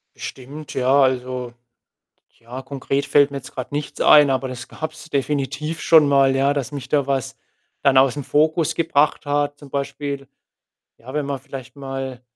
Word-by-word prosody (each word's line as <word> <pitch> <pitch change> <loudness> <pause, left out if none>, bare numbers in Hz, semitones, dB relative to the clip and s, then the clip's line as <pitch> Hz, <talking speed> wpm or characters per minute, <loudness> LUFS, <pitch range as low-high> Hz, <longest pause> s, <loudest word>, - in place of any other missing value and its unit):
Bestimmt, 140 +4 -8
ja, 130 +2 +3
also 125 -1 -1 0.9
ja, 120 +3 -8
konkret 135 +1 -2
fällt 145 0 +4
mir 140 - -4
jetzt 130 -1 -10
grad 130 - -6
nichts 145 0 -4
ein, 150 -2 +7
aber 130 0 0
das 125 -1 -7
gab's 155 0 -7
definitiv 150 +2 -2
schon 160 -3 +6
mal, 135 -1 +4
ja, 135 +1 +2
dass 140 -1 -3
mich 140 -3 -7
da 140 -2 +1
was 135 -3 -2 0.5
dann 135 -1 +4
aus'm 135 +2 +3
Fokus 155 +4 +1
gebracht 150 -3 +1
hat. 145 0 -1
Zum 145 - -13
Beispiel, 140 0 -4 0.7
ja, 130 +3 -11
wenn 150 -1 -1
man 140 -1 -3
vielleicht 135 -2 -10
mal 135 -2 -6
140 Hz, 165 wpm, -21 LUFS, 130-145 Hz, 0.9 s, ein